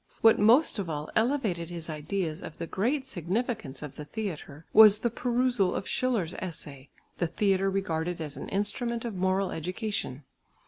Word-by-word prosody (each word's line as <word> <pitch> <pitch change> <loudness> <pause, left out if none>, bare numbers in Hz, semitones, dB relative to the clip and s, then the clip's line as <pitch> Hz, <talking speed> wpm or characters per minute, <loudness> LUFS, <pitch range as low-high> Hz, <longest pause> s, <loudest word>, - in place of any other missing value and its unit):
What 225 -1 +6
most 230 +4 +5
of 185 -4 -3
all 150 -1 -4
elevated 220 - +1
his 170 -2 -6
ideas 160 +2 -3
of 160 - -8
the 170 - -4
great 250 - -1
significance 195 - -3
of 145 -2 -8
the 150 - -6
theatre 160 -6 -6
was 215 -1 +8
the 235 - +1
perusal 245 -5 +1
of - - -3
Schiller's 220 -10 0
essay, 145 -6 -7 0.3
"The 175 - +1
theatre 195 +2 +1
regarded 175 -3 -2
as 150 -3 -4
an - - -7
instrument 235 +4 -2
of 230 - -3
moral 190 +1 0
education." 180 - -3
190 Hz, 165 wpm, -28 LUFS, 160-225 Hz, 0.3 s, was